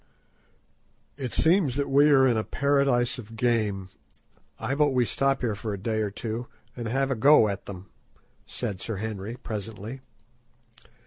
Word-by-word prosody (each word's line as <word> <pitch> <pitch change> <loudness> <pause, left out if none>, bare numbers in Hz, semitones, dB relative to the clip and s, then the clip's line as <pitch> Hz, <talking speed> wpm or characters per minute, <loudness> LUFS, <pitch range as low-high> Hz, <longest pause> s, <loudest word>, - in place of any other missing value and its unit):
"It 130 -3 -5
seems 160 -6 +3
that 140 0 -1
we 140 +2 +5
are 135 -2 +6
in 125 -3 +3
a 110 - 0
paradise 135 -3 +1
of 115 -1 -10
game. 110 -5 0 0.7
I 135 - -2
vote 145 -1 +2
we 125 -1 +3
stop 135 +3 +1
here 120 -3 0
a 105 0 -4
day 110 +3 -1
or 105 - -1
two, 115 +4 -5 0.3
and 120 -2 -5
have 135 +4 0
a - - +1
go 135 0 +6
at 100 -2 -5
them," 95 -1 -9 0.6
said 100 -2 -4
Sir 115 - -4
Henry, 105 +1 -5
presently. 110 +2 -6
120 Hz, 155 wpm, -26 LUFS, 110-135 Hz, 0.7 s, are